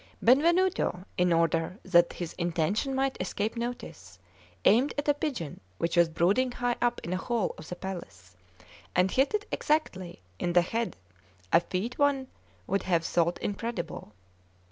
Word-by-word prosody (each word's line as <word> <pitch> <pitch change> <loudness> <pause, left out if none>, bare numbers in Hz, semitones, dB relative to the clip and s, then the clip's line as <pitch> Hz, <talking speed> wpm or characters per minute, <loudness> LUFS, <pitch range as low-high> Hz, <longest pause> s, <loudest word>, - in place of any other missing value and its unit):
Benvenuto, 320 - +3
in 180 0 +2
order 165 +2 +1
that 175 -2 +4
his 175 -2 -5
intention 175 - 0
might 270 -3 0
escape 205 +4 -2
notice, 230 - -6 0.5
aimed 250 +8 +4
at 290 - -2
a 290 - +5
pigeon 270 - -4 0.2
which 170 +1 -1
was 170 -1 +5
brooding 200 +11 +2
high 245 0 0
up 240 0 +1
in 170 - -3
a - - 0
hole 230 +1 -1
of 155 - -11
the 180 - -4
palace, 95 - -8 0.6
and 180 +1 +3
hit 270 +9 +2
it 415 -1 -2
exactly 185 - -1 0.2
in 175 - -1
the 175 0 +5
head 230 +5 -2 0.6
a - - +8
feat 190 +7 -4
one 285 -2 +3 0.4
would 195 - 0
have 170 -3 +1
thought 170 0 +1
incredible. 205 - -4
190 Hz, 155 wpm, -29 LUFS, 170-250 Hz, 0.6 s, a